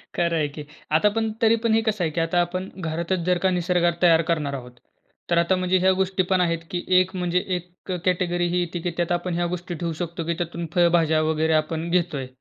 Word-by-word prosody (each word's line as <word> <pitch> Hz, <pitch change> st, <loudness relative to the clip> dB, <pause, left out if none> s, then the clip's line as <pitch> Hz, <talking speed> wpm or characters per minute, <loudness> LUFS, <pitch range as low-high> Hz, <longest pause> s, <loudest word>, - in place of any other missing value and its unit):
खरं 170 Hz, -1 st, +1 dB
आहे 155 Hz, -2 st, +1 dB
की. 150 Hz, -, -5 dB, 0.3 s
आता 160 Hz, +7 st, +4 dB
पण 225 Hz, -1 st, 0 dB
तरी 225 Hz, 0 st, +5 dB
पण 230 Hz, -1 st, +2 dB
हे 225 Hz, -, +4 dB
कसं 210 Hz, -4 st, 0 dB
आहे 160 Hz, -, 0 dB
की 165 Hz, -, -3 dB
आता 165 Hz, +2 st, +2 dB
आपण 185 Hz, +2 st, -3 dB
घरातच 170 Hz, +3 st, -2 dB
जर 180 Hz, -, +3 dB
का -, -, +5 dB
निसर्ग 175 Hz, -1 st, +2 dB
तयार 165 Hz, -2 st, +6 dB
करणार 150 Hz, -4 st, 0 dB
आहोत, 125 Hz, -2 st, -8 dB, 0.6 s
तर 170 Hz, -, +2 dB
आता 170 Hz, +2 st, +3 dB
म्हणजे 185 Hz, 0 st, +1 dB
ह्या 190 Hz, +1 st, +4 dB
गोष्टी 190 Hz, 0 st, 0 dB
पण 185 Hz, -1 st, +3 dB
आहेत 170 Hz, -2 st, +1 dB
की 175 Hz, -1 st, -2 dB, 0.2 s
एक 185 Hz, +1 st, -1 dB
म्हणजे 180 Hz, -1 st, 0 dB, 0.2 s
एक 180 Hz, +2 st, -8 dB
अ, -, -, 0 dB
कॅटेगरी 175 Hz, -1 st, +1 dB
ही 180 Hz, -, +2 dB
येते 175 Hz, 0 st, -3 dB
की 175 Hz, -, 0 dB
त्यात 175 Hz, -1 st, -1 dB
आपण 175 Hz, 0 st, -1 dB
ह्या 175 Hz, 0 st, 0 dB
गोष्टी 180 Hz, 0 st, -7 dB
ठेवू 170 Hz, 0 st, -3 dB
शकतो 170 Hz, 0 st, -4 dB
की 170 Hz, -, +1 dB
त्यातून 170 Hz, 0 st, -4 dB
फळभाज्या 170 Hz, -3 st, +3 dB
वगैरे 160 Hz, 0 st, +1 dB
आपण 160 Hz, +2 st, 0 dB
घेतोय. 170 Hz, -7 st, 0 dB
175 Hz, 230 wpm, -24 LUFS, 165-180 Hz, 0.6 s, तयार